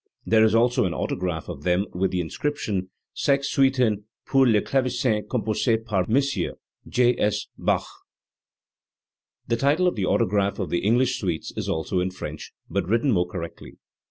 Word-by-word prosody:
There 110 0 +4
is 110 0 +4
also 120 0 +3
an 90 - -2
autograph 90 -3 -3
of 70 - -7
them 90 +4 +1
with 95 +2 0
the 90 - -1
in 80 - -6
scription: 105 -11 -2 0.2
"Sex 140 -1 0
Suiten 125 -7 +2 0.2
pur 135 -1 +4
le 110 -3 +4
Clavesin 125 -3 0
compossee 115 -1 +1
par 100 -5 0
Mos: 140 +4 +2 0.5
J. 125 0 +2
S. 105 - +1
Bach." - - 0 1.6
The 115 - +1
title 145 +8 +2
of 180 - +1
the 95 -4 -1
autograph 100 0 +1
of 95 - -3
the 85 - +1
English 125 +4 +2
suites 85 -6 -3
is - - -3
also 80 +4 -1
in 90 +1 0
French, 80 -4 -7 0.2
but 100 -4 -2
written 115 +5 +2
more 90 -4 +2
correctly. 85 -2 -8
110 Hz, 165 wpm, -24 LUFS, 90-125 Hz, 1.6 s, There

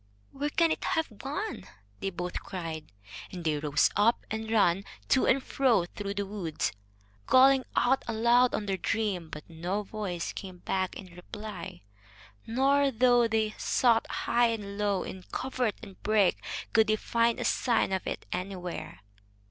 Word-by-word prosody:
"Where 285 +2 -2
can 330 +2 +3
it - - -2
have 310 -10 -1
gone?" 385 +11 -4 0.3
they 195 - -2
both 180 -1 -4
cried. 165 -4 -6 0.4
And 180 -2 -6
they 155 -2 0
rose 145 -1 +2
up 220 +3 +3
and 220 0 -3
ran 200 -4 +3 0.3
to 260 - +4
and 265 +1 +3
fro 240 -10 +2
through 200 +2 -5
the 200 0 -1
wood, 190 -6 -2 0.6
calling 265 0 +6
out 265 +2 +3
aloud 235 +2 +4
on 210 - -3
their 195 -1 -1
dream. 195 -4 -1
But 150 -1 -9
no 175 +5 -3
voice 195 -5 -4
came 185 -2 -8
back 185 +1 -2
in 185 -3 -10
reply, 195 - -8 0.6
nor, 275 +4 +3
though 245 -1 +4
they 220 -1 0
sought 235 -3 +3
high 240 0 +2
and 205 -3 -4
low 200 -3 +1
in 190 - -7
covert 255 -5 -1
and 195 - -12
brake, 210 -4 +2 0.3
could 220 -1 +5
they 215 - +3
find 230 +1 +1
a - - -2
sign 235 -6 +2
of 190 -1 -2
it - - -4
anywhere. 180 - -5
210 Hz, 160 wpm, -29 LUFS, 185-240 Hz, 0.6 s, calling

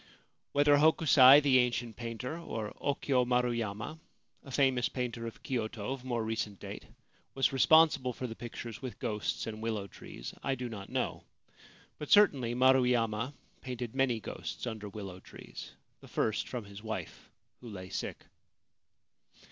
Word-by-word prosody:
Whether 145 0 +5
Hokusai, 145 -3 +7
the 135 -3 +5
ancient 120 -2 0
painter, 120 +5 -5
or 110 -10 -5
Okyo 140 -2 +1
Maru 125 0 +2
yama, 115 +6 -4 0.4
a 140 - -12
famous 130 -2 +2
painter 120 -2 -3
of 115 - -10
Kyoto 110 -3 -3
of 135 -2 -8
more 120 -3 -1
recent 110 -3 -3
date, - - -8 0.5
was 135 0 +2
responsible 150 -2 +5
for 125 - -6
the 115 - -4
pictures 115 -1 -7
with 130 -2 -6
ghosts 105 -1 -2
and 110 -1 -6
willow 110 -3 -2
trees, - - -9
I 135 - 0
do 125 -1 -5
not 100 -3 -8
know; - - -2 0.7
but 150 - -6
certainly 135 - +5
Maruyama 125 -1 +3 0.3
painted 125 -3 -5
many 130 -4 +1
ghosts 110 - -6
under 110 -3 -5
willow 95 -3 -8
trees - - -11
— - - -44
the - - -13
first 110 -2 -1
from 120 -4 -5
his 100 0 -11
wife, 110 0 -6 0.3
who 120 - -10
lay 95 -3 -8
sick. 95 - -5
120 Hz, 155 wpm, -31 LUFS, 110-130 Hz, 0.7 s, Hokusai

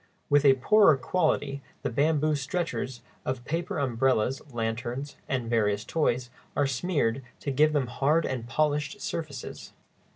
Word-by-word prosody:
With 145 0 +5
a 135 -1 +7
poorer 160 +3 +5
quality 145 -1 0 0.2
the - - -1
bamboo 155 +3 +2
stretchers 135 -4 -3 0.2
of 130 -2 -3
paper 170 +4 -2
umbrellas, 130 -1 +1
lanterns, 120 +4 -3
and 125 -3 -1
various 105 -3 +1
toys 125 -6 0 0.2
are 145 - +3
smeared 135 -3 0 0.2
to 140 - -2
give 150 +3 +4
them 145 -3 +2
hard 145 +6 +1
and 125 -3 -3
polished 150 - 0
surfaces. 155 -10 -6
140 Hz, 135 wpm, -28 LUFS, 125-155 Hz, 0.2 s, a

